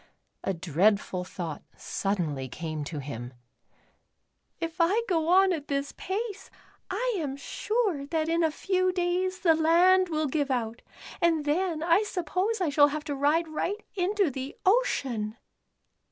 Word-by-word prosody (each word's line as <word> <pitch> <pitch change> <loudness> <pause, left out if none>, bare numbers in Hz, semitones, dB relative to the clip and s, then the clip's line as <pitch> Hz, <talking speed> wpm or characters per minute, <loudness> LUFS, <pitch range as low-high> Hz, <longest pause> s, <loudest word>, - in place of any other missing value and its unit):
A - - 0
dreadful 185 +2 +1
thought 170 -4 -6 0.2
suddenly 160 -10 -2
came 155 +2 -4
to 155 +1 -5
him 125 -3 -6 0.4
— - - -39
'* - - -50 0.3
If 330 0 -4
I 400 +8 +3
go 325 -4 +1
on 375 +2 +5
at 300 -3 -5
this 280 0 -1
pace 395 0 -4 0.4
I - - -1
am 280 -4 -3
sure 385 -2 -1
that 320 0 -1
in 335 +1 +2
a 320 - +4
few 370 +3 0
days 365 +1 -1
the 335 -3 +5
land 350 +4 +4
will 310 -1 0
give 285 0 0
out, 235 -2 -2 0.4
and 325 -3 +2
then 320 +1 0
I 340 +4 +4
suppose 380 +2 -1
I 360 -4 +1
shall 290 0 +6
have 300 +1 -4
to 290 - -3
ride 300 +4 +2
right 370 +7 -3
into 390 -2 +1
the 265 +2 -6
ocean." 260 - +1
320 Hz, 155 wpm, -28 LUFS, 255-370 Hz, 0.4 s, shall